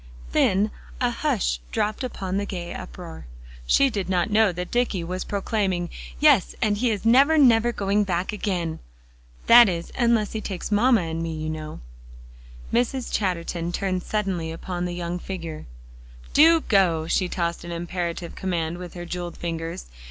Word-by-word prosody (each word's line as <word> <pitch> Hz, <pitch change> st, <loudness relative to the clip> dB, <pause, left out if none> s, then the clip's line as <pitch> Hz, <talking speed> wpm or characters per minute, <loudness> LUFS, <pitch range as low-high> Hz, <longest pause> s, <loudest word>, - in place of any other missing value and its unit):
Then 195 Hz, -, +2 dB, 0.3 s
a -, -, +1 dB
hush -, -, 0 dB
dropped 210 Hz, -, -1 dB
upon 195 Hz, -6 st, -3 dB
the 200 Hz, -, -1 dB
gay 175 Hz, -3 st, -5 dB
uproar. 75 Hz, +4 st, -9 dB, 0.4 s
She 275 Hz, -1 st, +4 dB
did 195 Hz, -4 st, -3 dB
not 180 Hz, +2 st, +1 dB
know 215 Hz, -1 st, +4 dB
that 180 Hz, +1 st, -6 dB
Dicky 240 Hz, -7 st, 0 dB
was 180 Hz, +2 st, -4 dB
proclaiming 195 Hz, -4 st, -1 dB, 0.3 s
"Yes, -, -, +4 dB
and 205 Hz, -1 st, +1 dB
he 245 Hz, +1 st, +2 dB
is 210 Hz, -1 st, -2 dB
never, 275 Hz, +7 st, +5 dB
never 240 Hz, -4 st, +5 dB
going 205 Hz, -1 st, +1 dB
back 185 Hz, 0 st, -2 dB
again. 180 Hz, -6 st, -2 dB, 0.7 s
That 235 Hz, -2 st, +9 dB
is, 170 Hz, -2 st, -4 dB
unless 235 Hz, -4 st, +2 dB
he 220 Hz, -, -4 dB
takes 195 Hz, -1 st, -5 dB
mamma 230 Hz, +1 st, +4 dB
and 165 Hz, -1 st, -3 dB
me, 165 Hz, -1 st, -3 dB
you 155 Hz, 0 st, -3 dB
know." 155 Hz, -1 st, -7 dB, 0.9 s
Mrs. 245 Hz, +1 st, 0 dB
Chatterton 175 Hz, -3 st, -1 dB
turned 185 Hz, 0 st, -1 dB
suddenly 185 Hz, -6 st, -2 dB
upon 175 Hz, +2 st, -4 dB
the 175 Hz, 0 st, -4 dB
young 175 Hz, 0 st, -3 dB
figure. 170 Hz, -5 st, -6 dB, 0.7 s
"Do 325 Hz, +2 st, +6 dB
go!" 180 Hz, -, +2 dB
She 180 Hz, +2 st, 0 dB
tossed 170 Hz, -1 st, -2 dB
an 170 Hz, -, -7 dB
imperative 170 Hz, 0 st, -4 dB
command 175 Hz, -2 st, -2 dB
with 180 Hz, -1 st, -8 dB
her 175 Hz, 0 st, -6 dB
jeweled 175 Hz, 0 st, -5 dB
fingers. 165 Hz, -, -4 dB
185 Hz, 160 wpm, -24 LUFS, 170-210 Hz, 0.9 s, That